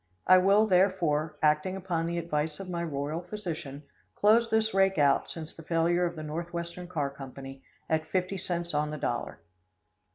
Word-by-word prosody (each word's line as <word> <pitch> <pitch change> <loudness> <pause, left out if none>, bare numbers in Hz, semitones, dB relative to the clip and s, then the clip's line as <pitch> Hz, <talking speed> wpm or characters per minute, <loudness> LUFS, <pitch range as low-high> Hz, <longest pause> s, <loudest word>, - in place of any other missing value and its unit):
I 185 0 +7
will, 200 +3 +5
therefore, 175 -6 +2
acting 150 +5 +2
upon 175 -3 -2
the 170 0 -2
advice 155 -2 -2
of 195 - -7
my 170 -1 -3
royal 150 +1 -3
physician, 170 -7 -6 0.3
close 230 +3 +4
this 220 0 +2
rake 195 -1 +3
out, 140 -2 +3
since 160 -2 -6
the - - -11
failure 170 +2 +1
of 170 - -6
the 155 - -6
Northwestern 170 +3 -5
Car 150 -6 -2
Company, 135 0 -9 0.3
at 160 0 0
50 185 +2 -1
cents 175 -2 -3
on 150 +1 0
the 150 - -5
dollar. 140 - -3
170 Hz, 170 wpm, -29 LUFS, 150-185 Hz, 0.3 s, I